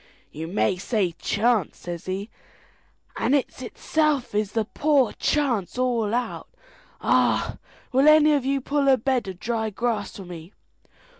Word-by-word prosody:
"You 160 Hz, +2 st, -6 dB
may 190 Hz, +1 st, +1 dB
say 195 Hz, -2 st, 0 dB
chance," 220 Hz, -4 st, +1 dB
says 175 Hz, +1 st, -7 dB
he, 195 Hz, +3 st, -4 dB, 0.9 s
"and 280 Hz, -, +2 dB
it's 265 Hz, -2 st, -2 dB
itself 300 Hz, -1 st, -1 dB
is 210 Hz, -1 st, -1 dB
the 225 Hz, -2 st, 0 dB
poor 280 Hz, 0 st, +2 dB
chance 250 Hz, -10 st, 0 dB
all 235 Hz, -4 st, +1 dB
out. 245 Hz, 0 st, -3 dB, 0.5 s
Ah, -, -, +2 dB, 0.3 s
will 270 Hz, +3 st, +4 dB
any 305 Hz, 0 st, +7 dB
of 285 Hz, -3 st, +1 dB
you 275 Hz, +1 st, 0 dB
pull 280 Hz, +1 st, 0 dB
a 265 Hz, -1 st, +6 dB
bed 255 Hz, -2 st, 0 dB
of 185 Hz, -2 st, -7 dB
dry 225 Hz, -2 st, -2 dB
grass 215 Hz, -1 st, -2 dB
for 195 Hz, -, -8 dB
me? 175 Hz, +1 st, -10 dB
235 Hz, 150 wpm, -24 LUFS, 200-270 Hz, 0.9 s, any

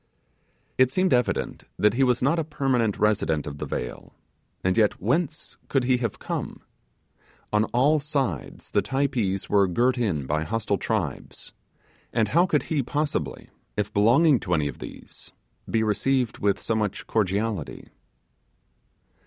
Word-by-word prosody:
It 130 Hz, -1 st, +6 dB
seemed 185 Hz, +3 st, +2 dB
evident 125 Hz, -1 st, 0 dB
that 105 Hz, 0 st, +3 dB
he 135 Hz, +3 st, +2 dB
was 125 Hz, -1 st, +2 dB
not 155 Hz, +6 st, +2 dB
a -, -, +1 dB
permanent 135 Hz, -8 st, 0 dB
resident 100 Hz, -8 st, +1 dB
of 70 Hz, 0 st, -7 dB
the -, -, -4 dB
vale, 60 Hz, -, -5 dB, 0.5 s
and 95 Hz, 0 st, +2 dB
yet, 105 Hz, -2 st, +2 dB
whence 155 Hz, -, -1 dB
could 135 Hz, -2 st, +1 dB
he 125 Hz, 0 st, +3 dB
have 115 Hz, -4 st, -3 dB
come? -, -, -5 dB, 0.9 s
On 105 Hz, +1 st, +3 dB
all 140 Hz, +7 st, +3 dB
sides 135 Hz, -, -3 dB
the -, -, +3 dB
Typees 130 Hz, -8 st, -1 dB
were 100 Hz, -1 st, +4 dB
girt 120 Hz, +8 st, +1 dB
in 85 Hz, -, 0 dB
by 75 Hz, +3 st, 0 dB
hostile 105 Hz, 0 st, -1 dB
tribes, -, -, -3 dB, 0.6 s
and 110 Hz, -3 st, +1 dB
how 175 Hz, -, +4 dB
could 150 Hz, -4 st, +1 dB
he 155 Hz, -3 st, 0 dB
possibly, 145 Hz, +4 st, -2 dB, 0.3 s
if 105 Hz, -1 st, -1 dB
belonging 125 Hz, +7 st, +5 dB
to 90 Hz, -, 0 dB
any 75 Hz, -2 st, +1 dB
of 70 Hz, -, -7 dB
these, -, -, -10 dB, 0.4 s
be 110 Hz, -1 st, +1 dB
received 125 Hz, +3 st, 0 dB
with 100 Hz, -1 st, +1 dB
so -, -, -2 dB
much 105 Hz, -2 st, -2 dB
cordiality? 105 Hz, -4 st, -2 dB
115 Hz, 150 wpm, -25 LUFS, 100-135 Hz, 0.9 s, It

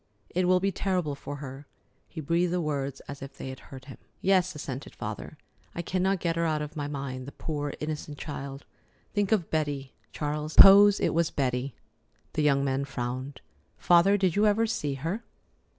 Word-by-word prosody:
"It 180 Hz, 0 st, +1 dB
will 185 Hz, 0 st, +5 dB
be 195 Hz, +1 st, +1 dB
terrible 180 Hz, -5 st, -1 dB
for 145 Hz, +1 st, -7 dB
her." 140 Hz, 0 st, -8 dB, 0.4 s
He 160 Hz, -, -6 dB
breathed 170 Hz, +4 st, +1 dB
the 180 Hz, -, +1 dB
words 140 Hz, -4 st, -2 dB
as 140 Hz, 0 st, -9 dB
if 135 Hz, 0 st, -9 dB
they 130 Hz, -, -6 dB
hurt 130 Hz, 0 st, -12 dB
him. 135 Hz, -, -11 dB, 0.2 s
"Yes," 185 Hz, -2 st, +2 dB
assented 140 Hz, -2 st, -6 dB
the -, -, -23 dB
father; -, -, -6 dB, 0.4 s
"I 170 Hz, -, -3 dB
cannot 185 Hz, +2 st, 0 dB
get 165 Hz, -1 st, 0 dB
her 170 Hz, -, +1 dB
out 155 Hz, -1 st, 0 dB
of 150 Hz, -, -8 dB
my 145 Hz, -2 st, -3 dB
mind, 135 Hz, -3 st, -5 dB
the -, -, -7 dB
poor 145 Hz, -2 st, -4 dB
innocent 150 Hz, -1 st, -5 dB
child! 140 Hz, -2 st, -6 dB, 0.5 s
Think 205 Hz, -1 st, 0 dB
of 200 Hz, -7 st, +1 dB
Betty, 145 Hz, -4 st, -2 dB, 0.2 s
Charles. 150 Hz, +1 st, -3 dB
Suppose 200 Hz, +1 st, +9 dB
it -, -, +1 dB
was 165 Hz, 0 st, +2 dB
Betty." 130 Hz, -1 st, -1 dB, 0.6 s
The 155 Hz, -, 0 dB
young 140 Hz, -2 st, +3 dB
man 135 Hz, 0 st, 0 dB
frowned. 130 Hz, 0 st, -5 dB, 0.4 s
"Father, 180 Hz, +4 st, +5 dB
did 185 Hz, -4 st, +1 dB
you 210 Hz, +1 st, +4 dB
ever 215 Hz, +2 st, +3 dB
see 145 Hz, -10 st, -2 dB
her?" 165 Hz, -, -3 dB
150 Hz, 185 wpm, -28 LUFS, 140-180 Hz, 0.6 s, Suppose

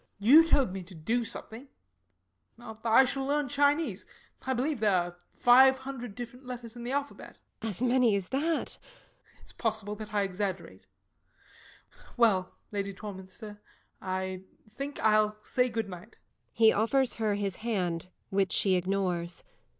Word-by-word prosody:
You 280 Hz, +11 st, +7 dB
told 270 Hz, -, +3 dB
me 190 Hz, -, -4 dB
to 180 Hz, +1 st, -13 dB
do 225 Hz, +10 st, -1 dB
something. 230 Hz, +3 st, -7 dB, 0.9 s
I 230 Hz, +2 st, +3 dB
shall 270 Hz, +1 st, -1 dB
learn 290 Hz, +1 st, 0 dB
Chinese. 285 Hz, +4 st, +1 dB, 0.4 s
I 260 Hz, -, +2 dB
believe 270 Hz, +2 st, -1 dB
there 205 Hz, -3 st, +3 dB
are 175 Hz, 0 st, -1 dB, 0.2 s
five 265 Hz, +2 st, +7 dB
hundred 250 Hz, -4 st, -7 dB, 0.2 s
letters 245 Hz, -2 st, -8 dB
in 240 Hz, -, -8 dB
the 245 Hz, -, -4 dB
alphabet. 285 Hz, +1 st, -4 dB, 0.2 s
LADY 220 Hz, -3 st, -3 dB
TORMINSTER. 240 Hz, -, -1 dB
As -, -, +2 dB
many 245 Hz, -3 st, +4 dB
as 195 Hz, -2 st, -2 dB
that! 265 Hz, -, 0 dB, 0.3 s
SIR -, -, -2 dB
GEOFFREY. -, -, -26 dB
It -, -, -19 dB
is -, -, -11 dB
possible 215 Hz, -3 st, -2 dB
that 215 Hz, 0 st, -8 dB
I 205 Hz, -1 st, +1 dB
exaggerate. 185 Hz, -, -4 dB, 1.3 s
Well, 200 Hz, -6 st, +3 dB, 0.2 s
Lady 200 Hz, -1 st, -3 dB
Torminster, 205 Hz, +1 st, -9 dB, 0.4 s
I 185 Hz, 0 st, -3 dB, 0.3 s
think 275 Hz, +5 st, -6 dB
I'll 215 Hz, 0 st, +3 dB
say 250 Hz, 0 st, +1 dB
good 225 Hz, -2 st, -2 dB
night. 185 Hz, +4 st, -11 dB, 0.4 s
[_He 220 Hz, -1 st, +6 dB
offers 250 Hz, +4 st, +2 dB
his 205 Hz, -3 st, -1 dB
hand, 180 Hz, -7 st, -2 dB, 0.2 s
which 195 Hz, -1 st, +1 dB
she 195 Hz, -, +4 dB
ignores. 180 Hz, -2 st, -1 dB
220 Hz, 150 wpm, -29 LUFS, 195-250 Hz, 1.3 s, You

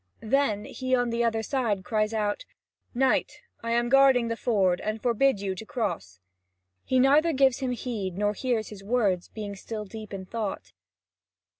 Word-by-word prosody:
Then 220 Hz, -3 st, +1 dB
he 255 Hz, 0 st, -1 dB
on 245 Hz, -1 st, 0 dB
the 235 Hz, +1 st, 0 dB
other 225 Hz, -1 st, 0 dB
side 220 Hz, -7 st, -1 dB
cries 215 Hz, -1 st, 0 dB
out: 210 Hz, -, -1 dB, 0.5 s
"Knight, 265 Hz, +1 st, +1 dB, 0.2 s
I 230 Hz, -, -4 dB
am 240 Hz, 0 st, +2 dB
guarding 265 Hz, -2 st, +5 dB
the 230 Hz, -, -1 dB
ford, 195 Hz, -7 st, +1 dB
and 215 Hz, +1 st, -3 dB
forbid 245 Hz, 0 st, +2 dB
you 195 Hz, -1 st, -2 dB
to 185 Hz, -, -7 dB
cross." 190 Hz, -, -4 dB, 0.6 s
He 260 Hz, -, +1 dB
neither 290 Hz, +6 st, +4 dB
gives 265 Hz, -2 st, +3 dB
him 260 Hz, -2 st, -2 dB
heed, 210 Hz, -7 st, -4 dB
nor 205 Hz, 0 st, +1 dB
hears 235 Hz, -1 st, -1 dB
his 200 Hz, -2 st, -10 dB
words, 200 Hz, -5 st, +1 dB
being 205 Hz, -2 st, -6 dB
still 215 Hz, +2 st, -6 dB
deep 215 Hz, +1 st, -9 dB
in 195 Hz, -1 st, -6 dB
thought. 215 Hz, 0 st, -5 dB
225 Hz, 170 wpm, -27 LUFS, 205-250 Hz, 0.6 s, guarding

